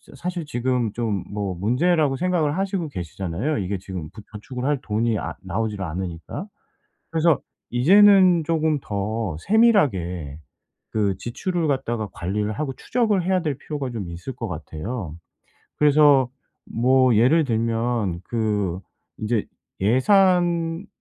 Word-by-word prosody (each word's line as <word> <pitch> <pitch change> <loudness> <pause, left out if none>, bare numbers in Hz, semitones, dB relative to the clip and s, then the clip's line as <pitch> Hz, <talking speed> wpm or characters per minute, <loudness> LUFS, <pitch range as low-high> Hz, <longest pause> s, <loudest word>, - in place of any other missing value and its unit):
저 - - -18
사실 175 -1 -4
지금 125 -5 -1
좀 110 -5 -2
뭐 100 -3 -2
문제라고 135 - +2
생각을 175 -3 0
하시고 195 -4 -1
계시잖아요. 95 - -3
이게 95 +1 -2
지금 90 -5 -7
부 110 - -11
저축을 125 +4 -6
할 145 -2 +1
돈이 110 +1 0
아 - - -4
나오지를 105 +1 -3
않으니까. 85 - -5 0.7
그래서 165 -2 +3 0.3
이제는 185 +5 +6
쪼금 155 -1 +1
더 100 -3 -3
세밀하게 95 - +2 0.5
그 100 -4 0
지출을 170 +7 -2
갖다가 120 -6 -1
관리를 105 +4 -2
하고 140 0 -3
추적을 215 - 0
해야 185 0 +2
될 150 -5 -2
필요가 145 -4 -4
좀 100 -7 -5
있을 90 +10 -7
것 115 - -5
같아요. 80 +3 -6 0.6
그래서 145 -3 +5 0.4
뭐 130 +1 +3
예를 145 +9 +4
들면 115 -6 -1
그 105 -6 -1 0.4
인제 110 0 0 0.4
예산 170 - +3
120 Hz, 275 characters per minute, -23 LUFS, 100-160 Hz, 0.7 s, 이제는